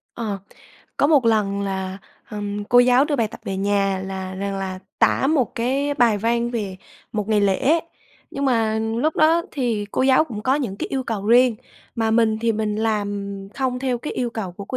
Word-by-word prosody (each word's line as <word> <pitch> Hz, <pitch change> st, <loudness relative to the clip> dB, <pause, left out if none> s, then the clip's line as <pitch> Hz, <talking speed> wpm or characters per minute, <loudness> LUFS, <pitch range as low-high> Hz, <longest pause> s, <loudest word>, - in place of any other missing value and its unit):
Ờ. 215 Hz, -4 st, -3 dB, 0.6 s
Có 285 Hz, -, +3 dB
một 290 Hz, -5 st, +4 dB
lần 205 Hz, -3 st, +2 dB
là, 190 Hz, -1 st, -3 dB, 0.3 s
ừm, 205 Hz, -1 st, -4 dB
cô 245 Hz, +3 st, +4 dB
giáo 250 Hz, +2 st, +5 dB
đưa 295 Hz, -2 st, -1 dB
bài 225 Hz, -4 st, +1 dB
tập -, -, -11 dB
về 195 Hz, -, -3 dB
nhà 195 Hz, -1 st, +1 dB
là 190 Hz, -1 st, -5 dB
rằng 195 Hz, +1 st, -3 dB
là 190 Hz, -1 st, -4 dB, 0.2 s
tả 270 Hz, -, +3 dB
một 280 Hz, -6 st, +1 dB
cái 275 Hz, +5 st, 0 dB
bài 230 Hz, -6 st, +3 dB
văn 235 Hz, +2 st, 0 dB
về 205 Hz, -6 st, -3 dB, 0.4 s
một 210 Hz, -1 st, -2 dB
ngày 210 Hz, -1 st, +3 dB
lễ, 230 Hz, -, +2 dB, 0.5 s
nhưng 275 Hz, -, -3 dB
mà 225 Hz, -4 st, +2 dB
lúc 230 Hz, +8 st, -1 dB
đó 325 Hz, +2 st, +4 dB
thì 235 Hz, -7 st, -1 dB
cô -, -, +1 dB
giáo 265 Hz, +3 st, +5 dB
cũng 215 Hz, -8 st, -7 dB
có 260 Hz, +3 st, +2 dB
những 240 Hz, -10 st, -2 dB
cái -, -, -3 dB
yêu 265 Hz, -1 st, -2 dB
cầu 210 Hz, -3 st, -3 dB
riêng, 240 Hz, 0 st, +5 dB, 0.4 s
mà 225 Hz, -2 st, 0 dB
mình 220 Hz, -1 st, +3 dB
thì 230 Hz, 0 st, +2 dB
mình 210 Hz, -1 st, -1 dB
làm 205 Hz, -2 st, -2 dB, 0.2 s
không 260 Hz, -2 st, -1 dB
theo 255 Hz, -2 st, -1 dB
cái 300 Hz, -, -5 dB
yêu 245 Hz, -1 st, -2 dB
cầu 220 Hz, -6 st, -5 dB
của 200 Hz, +3 st, -8 dB
cô 255 Hz, -, -4 dB
225 Hz, 205 wpm, -22 LUFS, 200-255 Hz, 0.6 s, giáo